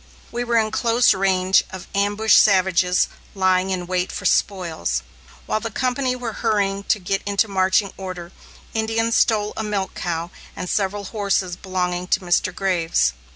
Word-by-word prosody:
We 240 Hz, +1 st, -2 dB
were 235 Hz, -1 st, +1 dB
in 215 Hz, -1 st, +1 dB
close 235 Hz, 0 st, +3 dB
range 190 Hz, -1 st, +2 dB
of 190 Hz, -1 st, -8 dB
ambushed 205 Hz, +2 st, +4 dB
savages, 185 Hz, -2 st, +3 dB, 0.3 s
lying 185 Hz, -1 st, +2 dB
in 185 Hz, -2 st, -2 dB
wait 180 Hz, 0 st, -1 dB
for -, -, -6 dB
spoils. 165 Hz, -, 0 dB, 0.4 s
While 215 Hz, -, 0 dB
the 230 Hz, +1 st, -4 dB
company 255 Hz, +3 st, -1 dB
were 245 Hz, -3 st, -5 dB
hurrying 200 Hz, -1 st, 0 dB
to -, -, +2 dB
get 195 Hz, 0 st, -2 dB
into 205 Hz, +2 st, +1 dB
marching 190 Hz, +1 st, +1 dB
order, 185 Hz, -2 st, -7 dB, 0.4 s
Indians 225 Hz, +1 st, 0 dB
stole 210 Hz, -2 st, +2 dB
a 220 Hz, -, -3 dB
milch 205 Hz, -3 st, -2 dB
cow 170 Hz, 0 st, -3 dB, 0.2 s
and 180 Hz, -, -5 dB
several 200 Hz, +1 st, -1 dB
horses 200 Hz, -3 st, -1 dB
belonging 180 Hz, -1 st, -3 dB
to -, -, +2 dB
Mr. 180 Hz, 0 st, +1 dB
Graves. 175 Hz, -, +1 dB
195 Hz, 155 wpm, -21 LUFS, 185-215 Hz, 0.4 s, ambushed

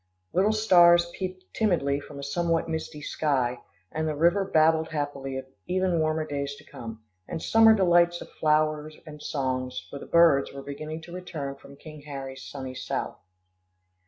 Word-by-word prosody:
Little 195 Hz, +4 st, +3 dB
stars 175 Hz, -5 st, +5 dB
peeped 185 Hz, -1 st, -5 dB
timidly 150 Hz, -10 st, +1 dB
from 145 Hz, 0 st, -11 dB
a 140 Hz, -, -7 dB
somewhat 165 Hz, +4 st, 0 dB
misty 160 Hz, -2 st, -5 dB
sky, 130 Hz, -6 st, 0 dB, 0.3 s
and 160 Hz, 0 st, -2 dB
the 155 Hz, -, -1 dB
river 170 Hz, +6 st, +3 dB
babbled 160 Hz, -3 st, +3 dB
happily 145 Hz, -3 st, -3 dB
of 130 Hz, -, -5 dB, 0.2 s
even 185 Hz, -1 st, +1 dB
warmer 155 Hz, 0 st, 0 dB
days 140 Hz, -1 st, -3 dB
to -, -, -15 dB
come, 115 Hz, -1 st, -9 dB, 0.2 s
and -, -, -4 dB
summer 225 Hz, +5 st, +6 dB
delights 175 Hz, -3 st, +4 dB
of -, -, -11 dB
flower 155 Hz, 0 st, +1 dB, 0.2 s
and 150 Hz, -1 st, -10 dB
song, 130 Hz, -3 st, -2 dB, 0.2 s
for 140 Hz, -, -6 dB
the -, -, -10 dB
birds 165 Hz, -5 st, +5 dB
were 140 Hz, 0 st, -8 dB
beginning 155 Hz, +3 st, -6 dB
to 170 Hz, +1 st, -11 dB
return 160 Hz, -6 st, -5 dB
from 140 Hz, 0 st, -15 dB
King 155 Hz, +1 st, -12 dB
Harry's 135 Hz, -2 st, -7 dB
sunny 130 Hz, -2 st, -7 dB
South. 130 Hz, -, -4 dB
155 Hz, 165 wpm, -27 LUFS, 140-170 Hz, 0.3 s, summer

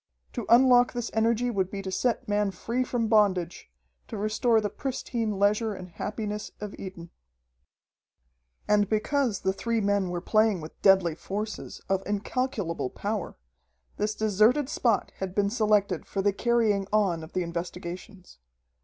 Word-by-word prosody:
To 240 Hz, -4 st, -4 dB
unlock 245 Hz, 0 st, +6 dB
this 240 Hz, -1 st, -3 dB
energy 230 Hz, +2 st, +2 dB
would 190 Hz, -4 st, 0 dB
be 195 Hz, 0 st, -5 dB
to 190 Hz, -, -4 dB
set 240 Hz, +5 st, 0 dB
man 205 Hz, -1 st, +1 dB
free 230 Hz, +7 st, -2 dB
from 245 Hz, -2 st, -1 dB
bondage, 195 Hz, -, +2 dB, 0.4 s
to -, -, -6 dB
restore 215 Hz, +2 st, +2 dB
the 210 Hz, -1 st, -2 dB
pristine 235 Hz, -5 st, -3 dB
leisure 210 Hz, +2 st, +2 dB
and 185 Hz, -1 st, -9 dB
happiness 210 Hz, +3 st, -4 dB
of 210 Hz, -1 st, -6 dB
Eden. 180 Hz, -3 st, -8 dB, 1.6 s
And 205 Hz, -1 st, +3 dB
because 225 Hz, 0 st, 0 dB
the 190 Hz, 0 st, +1 dB
three 230 Hz, +3 st, -1 dB
men 200 Hz, -2 st, +1 dB
were 175 Hz, 0 st, -2 dB
playing 215 Hz, +1 st, +2 dB
with 155 Hz, 0 st, -11 dB
deadly 190 Hz, -4 st, +5 dB
forces, 210 Hz, +6 st, -5 dB
of 195 Hz, -1 st, +1 dB
incalculable 205 Hz, -, -2 dB
power, 205 Hz, +5 st, -4 dB, 0.6 s
this 210 Hz, +1 st, -1 dB
deserted 220 Hz, +7 st, +3 dB
spot 230 Hz, -7 st, +1 dB
had 190 Hz, -1 st, -5 dB
been 200 Hz, -1 st, +2 dB
selected 210 Hz, -6 st, +1 dB
for 195 Hz, -, -2 dB
the 205 Hz, 0 st, +3 dB
carrying 220 Hz, -3 st, +1 dB
on 195 Hz, -6 st, +2 dB
of 160 Hz, -, -11 dB
the 185 Hz, -, 0 dB
investigations. 175 Hz, -, -7 dB
210 Hz, 150 wpm, -27 LUFS, 190-225 Hz, 1.6 s, unlock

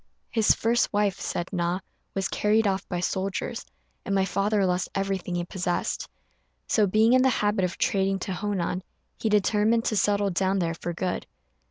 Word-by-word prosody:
"His 225 Hz, -2 st, +4 dB
first 235 Hz, +2 st, +1 dB
wife," 205 Hz, -2 st, +1 dB
said 175 Hz, +3 st, -3 dB
Na, 175 Hz, 0 st, 0 dB, 0.4 s
"was 195 Hz, -2 st, 0 dB
carried 215 Hz, +1 st, +2 dB
off 195 Hz, -1 st, -1 dB
by 180 Hz, -, -2 dB
soldiers, 190 Hz, +1 st, -2 dB, 0.4 s
and 195 Hz, -, -1 dB
my 190 Hz, -1 st, +3 dB
father 200 Hz, +1 st, +1 dB
lost 180 Hz, 0 st, 0 dB
everything 195 Hz, -2 st, -2 dB
he 175 Hz, -, -1 dB
possessed; 180 Hz, -1 st, -2 dB, 0.6 s
so, 210 Hz, -2 st, +3 dB
being 220 Hz, +5 st, +4 dB
in 255 Hz, -, +6 dB
the 260 Hz, -, +4 dB
habit 205 Hz, -5 st, +1 dB
of 175 Hz, -, -4 dB
trading 195 Hz, 0 st, +1 dB
to 190 Hz, -, -3 dB
Honan, 185 Hz, -2 st, -2 dB, 0.4 s
he 220 Hz, -, 0 dB
determined 210 Hz, +2 st, +2 dB
to 215 Hz, -, +1 dB
settle 205 Hz, -1 st, +2 dB
down 190 Hz, +2 st, +1 dB
there 170 Hz, -3 st, 0 dB
for 175 Hz, +1 st, -5 dB
good." 180 Hz, +1 st, -3 dB
195 Hz, 175 wpm, -26 LUFS, 185-210 Hz, 0.6 s, in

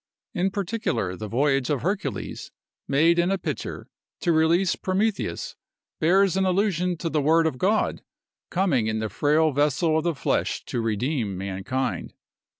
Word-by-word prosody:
In 185 Hz, +2 st, +1 dB
particular, 200 Hz, -, -2 dB
the 105 Hz, +4 st, -6 dB
voyage 135 Hz, +3 st, +1 dB
of 140 Hz, -4 st, -1 dB
Hercules, 195 Hz, +4 st, -3 dB, 0.4 s
made 165 Hz, +5 st, +3 dB
in 175 Hz, +1 st, +2 dB
a 195 Hz, -, +1 dB
pitcher, -, -, -5 dB, 0.4 s
to 175 Hz, -, +2 dB
release 170 Hz, +3 st, +3 dB
Prometheus, 195 Hz, +3 st, -1 dB, 0.4 s
bears 190 Hz, +3 st, +3 dB
an 190 Hz, -, +2 dB
allusion 180 Hz, -2 st, +1 dB
to 165 Hz, -, -3 dB
the 155 Hz, -2 st, 0 dB
word 160 Hz, +3 st, +4 dB
of 135 Hz, -6 st, -1 dB
God, 210 Hz, +3 st, +1 dB, 0.5 s
coming 175 Hz, -, +1 dB
in 110 Hz, 0 st, -1 dB
the 110 Hz, 0 st, -2 dB
frail 155 Hz, +4 st, +2 dB
vessel 150 Hz, +3 st, +2 dB
of -, -, -4 dB
the 170 Hz, -2 st, 0 dB
flesh 135 Hz, -, -1 dB
to 120 Hz, -, -2 dB
redeem 115 Hz, -1 st, -1 dB
mankind. 100 Hz, +8 st, -3 dB
160 Hz, 150 wpm, -25 LUFS, 130-185 Hz, 0.5 s, word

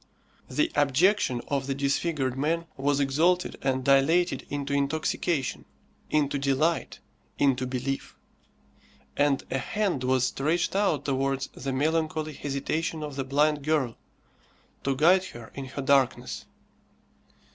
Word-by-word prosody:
The 320 Hz, +2 st, +1 dB
abjection 145 Hz, -, +2 dB
of 140 Hz, -2 st, -1 dB
the 135 Hz, -, -1 dB
disfigured 140 Hz, -1 st, 0 dB
man 160 Hz, +5 st, 0 dB
was 140 Hz, +1 st, +1 dB
exalted 160 Hz, +6 st, +2 dB
and 130 Hz, -1 st, 0 dB
dilated 155 Hz, +7 st, +3 dB
into 140 Hz, 0 st, -3 dB
intoxication, 140 Hz, 0 st, -1 dB, 0.5 s
into 145 Hz, -2 st, +1 dB
delight, 140 Hz, +5 st, 0 dB, 0.4 s
into 130 Hz, -2 st, +2 dB
belief; 130 Hz, +2 st, -3 dB, 1.0 s
and 145 Hz, -1 st, +2 dB
a 135 Hz, -, 0 dB
hand 190 Hz, -3 st, -1 dB
was 130 Hz, -1 st, +2 dB
stretched 160 Hz, +8 st, 0 dB
out 195 Hz, -7 st, +1 dB
towards 135 Hz, -1 st, -1 dB
the 135 Hz, +1 st, -4 dB
melancholy 155 Hz, +2 st, 0 dB
hesitation 150 Hz, +3 st, -2 dB
of 145 Hz, -2 st, -6 dB
the 135 Hz, -, -2 dB
blind 145 Hz, +2 st, +1 dB
girl, 145 Hz, -6 st, +1 dB, 0.9 s
to 135 Hz, -1 st, +1 dB
guide 180 Hz, +7 st, +5 dB
her 120 Hz, -9 st, -10 dB
in 135 Hz, -, -6 dB
her 135 Hz, +1 st, -6 dB
darkness. 135 Hz, -2 st, +1 dB
140 Hz, 125 wpm, -27 LUFS, 135-160 Hz, 1.0 s, guide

